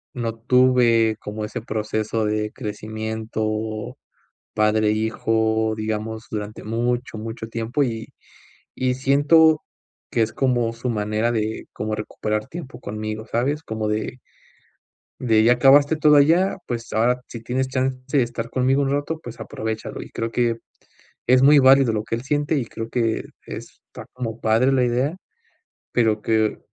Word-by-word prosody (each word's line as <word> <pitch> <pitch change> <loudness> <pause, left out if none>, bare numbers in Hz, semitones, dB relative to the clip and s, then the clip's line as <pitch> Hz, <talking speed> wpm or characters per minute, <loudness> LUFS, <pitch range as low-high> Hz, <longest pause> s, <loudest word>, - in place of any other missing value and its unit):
no 115 -2 -2
tuve 120 -2 +4
como 105 0 -5
ese 105 - -5
proceso 110 0 -2
de 105 0 -1
crecimiento, 110 -1 -4 0.6
padre 110 0 +3
e - - +3
hijo, 110 0 +1
digamos, 110 +1 -4
durante 105 0 -5
mucho, 120 +1 -2
mucho 110 +1 -6
tiempo, 115 +5 -1
y 115 -3 -3 0.7
y 130 0 0
siento 145 +4 +4 0.5
que 115 - +2
es 110 - -1
como 120 -4 +1
su 120 +2 -5
manera 110 +1 0
de, 110 -1 -2
como 110 0 -3
recuperar 110 0 -3
tiempo 135 -7 -8
conmigo, 110 +1 -5
¿sabes?, 140 +7 -1
como 110 -5 -3
de 105 +2 -2 1.1
de, 110 -3 +3
ya 120 - +6
acabaste 140 +4 +5
todo 150 -1 +5
allá, 165 +7 +4
pues 115 -1 -5
ahora, 120 +3 +2
si 115 - -8
tienes 130 +2 -1
chance 130 +1 -2
de 135 - +5
estar 120 0 -5
conmigo 130 +2 +2
un 135 - 0
rato, 145 +3 -2
pues, 120 -1 -9
aprovéchalo, 110 0 -5
y - - -10
creo 115 0 -3
que 120 -1 +1 0.7
es 130 +1 +5
muy 145 +2 +7
válido 135 -2 +6
lo 105 - -1
que 115 - -2
él 120 - -6
siente 145 +2 0
y 130 - -1
creo 115 0 -7
que 115 -2 0 0.2
está - - -10
como 115 -2 -5
padre 115 +4 +3
la 130 -2 +3
idea, 125 +6 0 0.8
pero 110 -3 +1
que, 110 -1 +1
115 Hz, 155 wpm, -22 LUFS, 110-130 Hz, 1.1 s, muy